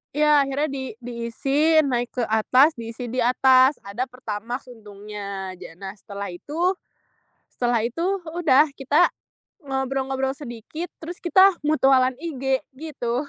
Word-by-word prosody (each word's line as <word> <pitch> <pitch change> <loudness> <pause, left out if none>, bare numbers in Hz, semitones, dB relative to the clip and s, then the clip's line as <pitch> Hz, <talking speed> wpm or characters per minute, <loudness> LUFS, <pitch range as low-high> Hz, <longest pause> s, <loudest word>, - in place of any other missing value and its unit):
iya 300 -1 +5
akhirnya 275 +3 -1
di 270 -1 -4 0.2
diisi, 270 +7 +1
naik 245 -3 -2
ke 245 - 0
atas 250 +7 +4
diisi 230 +1 -6
di 255 - -2
atas 260 +2 +5
ada 230 +6 -4
pertamax 245 0 -6
untungnya 205 -3 -7
ja 170 -2 -11
nah, 190 +1 -7
setelah 200 -2 -7
itu 290 - -9 0.9
setelah 240 -2 0
itu 250 +8 -4 0.2
udah 320 -3 +4
kita 290 +6 +3 0.6
ngobrol-ngobrol 265 -1 -2
sedikit 275 +5 -7
terus 345 +2 -9
kita 375 +2 +6
mutualan 265 -4 +3
IG 270 -4 -1 0.2
gitu. 260 -3 -3
260 Hz, 125 wpm, -23 LUFS, 230-290 Hz, 0.9 s, kita